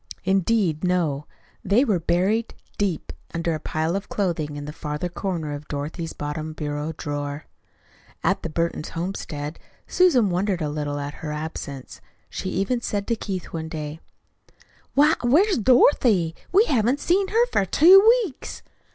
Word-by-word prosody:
Indeed, 190 -3 +1
no. 165 -6 0 0.4
They 215 +8 +3
were 200 -8 +1
buried 190 +7 0 0.2
deep 195 -6 -1 0.2
under 165 0 0
a 155 - -3
pile 160 +3 -1
of 200 +1 -4
clothing 165 -7 -1
in 145 0 -6
the 150 - -7
farther 150 +3 -4
corner 170 -5 -3
of 145 +1 -7
Dorothy's 155 +3 -4
bottom 155 +1 -4
bureau 150 0 -3
drawer. 145 0 -4 0.8
At - - +1
the 165 - -4
Burton 170 +1 -1
homestead 165 -3 -5 0.3
Susan 265 - +3
wondered 185 +1 0
a 150 - -1
little 145 -1 -3
at 145 0 -4
her 150 - -4
absence. 150 -3 -6 0.3
She 190 - -4
even 200 +7 -1
said 205 -3 -2
to 230 - +2
Keith 195 -4 -5
one 160 -1 -4
day: 155 0 -5 1.0
"Why, 295 +3 +6
where's 320 - +3
Dorothy? 225 - +4 0.2
We 405 +5 +5
haven't 250 - +2
see 370 +6 +2
her 460 +2 +4
for - - +3
two 335 - +7 0.2
weeks." 305 - -8
170 Hz, 150 wpm, -24 LUFS, 150-215 Hz, 1.0 s, two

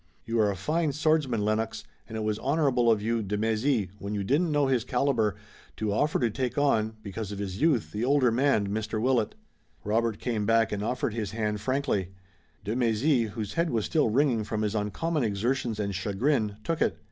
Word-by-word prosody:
You 115 0 -1
are 105 -1 +4
a 100 - -1
fine 155 - 0
swordsman, 150 -8 +1
Lennox, 110 +1 -1 0.2
and 110 - -6
it - - -2
was 105 0 -1
honorable 135 -5 +2
of 110 -2 +2
you, 115 +1 0
de 105 0 -2
Mézy, 110 -1 +1
when 100 +1 -4
you 100 - -1
didn't 150 - +1
know 145 -1 +3
his 130 -4 +1
caliber, 125 -4 +1 0.4
to 105 -2 -1
offer 150 +8 +1
to 120 -3 +1
take 130 +3 -3
on, 110 -6 +2
because 105 0 -5
of 100 - -5
his 100 -1 -5
youth, 150 -8 +2
the 105 +2 -3
older 130 -2 +3
man, 115 -5 +2
Mr. 110 +1 -2
Willet." 120 -2 +1 0.5
Robert 110 +1 0
came 110 -4 -2
back 115 0 +3
and 100 - -2
offered 120 0 -1
his 105 -4 -3
hand 105 -2 -2
frankly. 110 -7 -1 0.5
De 105 +3 -2
Mézy, 120 +1 +2
whose 105 -1 -5
head 170 0 +1
was 115 -5 0
still 155 -8 +2
ringing 125 -2 +2
from 110 0 -2
his 105 -1 -1
uncommon 130 +9 -1
exertions 115 +2 -1
and 100 -1 -1
chagrin, 105 +3 0
took 165 -1 -2
it. - - +1
115 Hz, 200 wpm, -28 LUFS, 105-135 Hz, 0.5 s, are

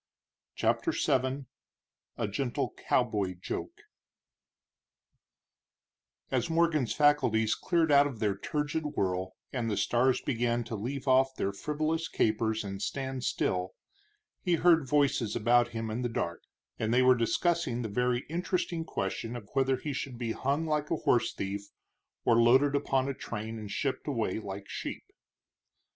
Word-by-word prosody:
CHAPTER 330 - +1
VII 135 -1 0 0.7
A 115 - -1
GENTLE 120 +5 -2 0.2
COWBOY 95 -3 +1
JOKE - - -5 2.5
As - - 0
Morgan's 165 -6 +2
faculties 125 -7 +3
cleared 165 +4 +1
out 145 0 +6
of 135 -5 -7
their 105 -2 0
turgid 150 +6 -2
whirl, 95 0 -1 0.2
and 120 -3 -1
the 105 - -1
stars 125 +2 +2
began 120 -2 0
to 115 0 -5
leave 130 +6 -4
off 130 0 +4
their 100 -4 -1
frivolous 155 +7 -1
capers 110 0 0
and 100 -1 -6
stand 130 +1 -3
still, 90 -5 -1 0.7
he 175 - +2
heard 165 -4 +4
voices 140 -6 +2
about 120 +2 +4
him 115 -2 -4
in 115 +3 -2
the 120 - -1
dark, 85 -7 -3 0.4
and 110 0 0
they 125 +2 +4
were 130 0 +7
discussing 125 +2 0
the - - -2
very 125 +3 0
interesting 175 0 -1
question 115 -3 -3
of 110 -4 -9
whether 135 -1 +2
he 145 +2 -4
should 130 -2 -4
be 115 -1 -2
hung 140 +7 -1
like 150 -1 -1
a - - +1
horse 120 -6 +2
thief 100 +1 -4 0.6
or 115 -1 +5
loaded 130 +5 +5
upon 135 -2 +1
a 140 - -1
train 110 -2 -5
and 105 -2 -7
shipped 135 +7 -2
away 115 -8 -1
like 100 -2 -7
sheep. - - -5
125 Hz, 150 wpm, -30 LUFS, 110-145 Hz, 2.5 s, were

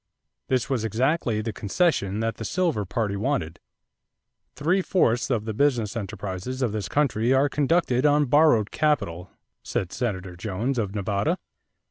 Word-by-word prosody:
This 130 -2 +1
was 130 -5 -1
exactly 120 - 0
the 110 0 -4
concession 105 - 0
that 115 0 -2
the - - -5
silver 165 - 0
party 105 +1 -2
wanted. 85 -5 -2 1.0
"Three 170 +7 +1
fourths 125 -12 +1
of 115 -5 0
the 110 - -3
business 120 -3 +1
enterprises 100 +4 -4
of 120 - +1
this 105 -1 -3
country 130 -4 +2
are 135 +2 +4
conducted 145 -3 +1
on 150 0 +4
borrowed 140 -6 +4
capital," 95 - 0 0.3
said 90 - -3
Senator 95 -7 -3
Jones, 110 +8 -2
of 100 -2 -2
Nevada. 100 0 0
115 Hz, 145 wpm, -25 LUFS, 100-140 Hz, 1.0 s, are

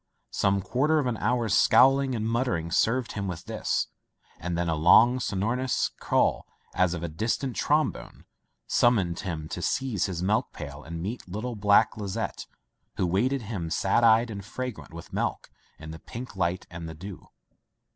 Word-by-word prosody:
Some 100 -1 +1
quarter 135 +10 +1
of 150 - +1
an 120 -3 -1
hour's 115 -2 +1
scowling 135 +6 +5
and 110 -1 -2
muttering 115 -9 -1
served 115 +7 +1
him 100 -1 -4
with 90 -3 -6
this, - - -1 0.5
and 90 -1 -3
then 85 0 0
a 80 - +1
long 110 +11 +5
so 105 - -3
norous 120 +6 0
call, - - +1 0.3
as 90 -1 +2
of 85 - -6
a - - -1
distant 115 - -2
trombone, - - -1 0.4
sum 120 0 +4
moned 85 -5 -1
him 80 -5 -4
to 90 - -5
seize 130 -4 0
his 90 -2 -4
milk 105 +3 0
pail 75 -2 -8
and 80 +1 -6
meet 110 0 -5
little 110 +6 -4
black 105 +2 +3
Lizette, 105 +1 -4 0.5
who - - +1
waited 120 +9 +1
him, 100 -7 -4
sad 95 +7 +1
eyed, 115 +1 +5
and 100 -2 -6
fragrant 125 0 -6
with 85 0 -11
milk, - - -2 0.3
in 75 - -9
the 80 - -9
pink 120 -1 -8
light 90 -1 -1
and 85 -1 -7
the 80 - -8
dew. 95 +3 -10
100 Hz, 175 wpm, -27 LUFS, 85-120 Hz, 0.5 s, scowling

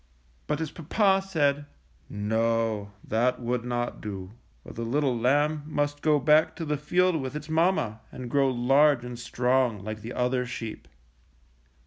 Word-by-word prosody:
But 150 - 0
his 160 -1 -4
papa 195 +4 +2
said: 145 -6 0 0.4
"No, 110 0 0
that 120 +3 +1
would 120 -1 -2
not 120 0 -3
do, 95 -3 -6 0.3
for - - -10
the 115 - -6
little 130 +2 0
lamb 145 +6 +2
must 145 -1 -1
go 155 -1 +4
back 150 +3 +4
to 165 - -5
the 150 0 0
field 170 +3 +1
with 130 +2 -5
its 150 +1 -6
mamma 160 - +1
and 125 -1 -7
grow 135 +2 +2
large 135 +1 +3
and 120 -1 -7
strong 125 -3 0
like 110 +1 -6
the 115 +3 -7
other 125 0 0
sheep. 115 -2 -6
130 Hz, 155 wpm, -27 LUFS, 115-150 Hz, 0.4 s, go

